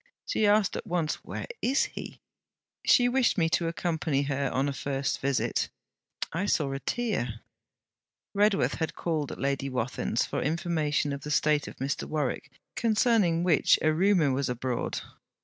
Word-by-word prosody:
She 215 Hz, -, +1 dB
asked 205 Hz, -1 st, +3 dB
at -, -, -5 dB
once, 170 Hz, -3 st, -1 dB
Where -, -, -5 dB, 0.2 s
is 270 Hz, +3 st, +2 dB
he? -, -, -8 dB, 0.6 s
She 245 Hz, -2 st, +5 dB
wished 250 Hz, -2 st, +2 dB
me 165 Hz, -2 st, +3 dB
to 170 Hz, 0 st, +1 dB
accompany 160 Hz, -4 st, -1 dB
her 140 Hz, -1 st, -1 dB
on 135 Hz, +2 st, +1 dB
a 140 Hz, -, -1 dB
first 135 Hz, 0 st, -2 dB
visit. 135 Hz, -2 st, 0 dB, 0.6 s
I 185 Hz, +5 st, -1 dB
saw 145 Hz, -8 st, +1 dB
a 135 Hz, -, -3 dB
tear.' 140 Hz, -, -2 dB, 0.9 s
Redworth 205 Hz, 0 st, +2 dB
had 160 Hz, -, -2 dB
called 155 Hz, -4 st, -2 dB
at -, -, -7 dB
Lady 135 Hz, +1 st, -1 dB
Wathin's 125 Hz, -2 st, -1 dB
for -, -, -3 dB
information 155 Hz, -2 st, 0 dB
of 140 Hz, -, -5 dB
the 150 Hz, -, -6 dB
state 150 Hz, 0 st, +2 dB
of -, -, -8 dB
Mr. 135 Hz, +2 st, -2 dB
Warwick, 150 Hz, -5 st, -2 dB, 0.3 s
concerning 215 Hz, -7 st, +2 dB
which 175 Hz, -5 st, +4 dB
a 155 Hz, 0 st, +4 dB
rumour 175 Hz, -4 st, +3 dB
was 130 Hz, 0 st, 0 dB
abroad. 125 Hz, 0 st, -2 dB
155 Hz, 160 wpm, -28 LUFS, 140-185 Hz, 0.9 s, She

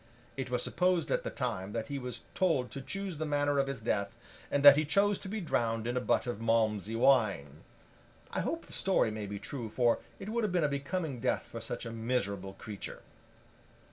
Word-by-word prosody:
It 135 Hz, -2 st, -4 dB
was 125 Hz, -1 st, +1 dB
supposed 180 Hz, -1 st, +1 dB
at -, -, +2 dB
the -, -, -4 dB
time 95 Hz, +2 st, -3 dB
that 115 Hz, -1 st, -2 dB
he 140 Hz, -1 st, -4 dB
was 125 Hz, -2 st, -6 dB
told 160 Hz, -9 st, +1 dB
to 135 Hz, -, -6 dB
choose 185 Hz, +4 st, -4 dB
the 155 Hz, -, -1 dB
manner 145 Hz, -1 st, +2 dB
of 135 Hz, -, +2 dB
his 135 Hz, -4 st, -3 dB
death, 105 Hz, -2 st, -1 dB, 0.3 s
and 145 Hz, 0 st, +1 dB
that 140 Hz, -1 st, +12 dB
he 155 Hz, -, +2 dB
chose 200 Hz, +6 st, +2 dB
to -, -, -8 dB
be 215 Hz, +2 st, -2 dB
drowned 115 Hz, -, 0 dB
in 120 Hz, +1 st, -1 dB
a 125 Hz, -, +1 dB
butt -, -, +1 dB
of 120 Hz, -3 st, -4 dB
Malmsey 110 Hz, -2 st, +1 dB
wine. 105 Hz, -, +2 dB, 0.7 s
I -, -, -2 dB
hope -, -, -2 dB
the -, -, -7 dB
story 110 Hz, -, +2 dB
may 105 Hz, -1 st, -5 dB
be 100 Hz, 0 st, -5 dB
true, 120 Hz, +1 st, -5 dB
for 120 Hz, +1 st, +2 dB, 0.2 s
it 195 Hz, -, -7 dB
would 235 Hz, +1 st, 0 dB
have 210 Hz, -, +1 dB
been 175 Hz, -2 st, +2 dB
a -, -, +4 dB
becoming 145 Hz, 0 st, -3 dB
death -, -, 0 dB
for -, -, -8 dB
such -, -, -3 dB
a 115 Hz, -, -5 dB
miserable 105 Hz, -5 st, -2 dB
creature. 100 Hz, -1 st, -8 dB
125 Hz, 215 wpm, -31 LUFS, 110-155 Hz, 0.7 s, that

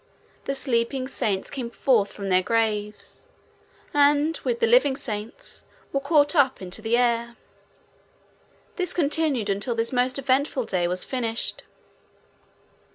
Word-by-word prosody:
The 275 Hz, -, -2 dB
sleeping 255 Hz, 0 st, 0 dB
saints 200 Hz, -7 st, -2 dB
came 255 Hz, -4 st, -4 dB
forth 235 Hz, -4 st, +1 dB
from 200 Hz, -1 st, -6 dB
their 185 Hz, 0 st, +4 dB
graves 210 Hz, 0 st, -2 dB, 0.7 s
and, 290 Hz, +2 st, +3 dB
with 475 Hz, -1 st, -2 dB
the 470 Hz, -, +3 dB
living 460 Hz, -, +4 dB
saints, 220 Hz, -5 st, -6 dB, 0.3 s
were 275 Hz, -, +2 dB
caught 290 Hz, +2 st, +3 dB
up 270 Hz, -4 st, +3 dB
into 185 Hz, +3 st, -6 dB
the 225 Hz, +2 st, +1 dB
air. 235 Hz, -1 st, +1 dB, 1.4 s
This 365 Hz, -2 st, 0 dB
continued 295 Hz, -, +1 dB
until 205 Hz, +4 st, -1 dB
this 230 Hz, +2 st, -1 dB
most 250 Hz, +1 st, +1 dB
eventful 270 Hz, -1 st, 0 dB
day 175 Hz, -4 st, 0 dB
was 180 Hz, +1 st, +1 dB
finished. 235 Hz, -3 st, -2 dB
245 Hz, 130 wpm, -24 LUFS, 220-280 Hz, 1.4 s, their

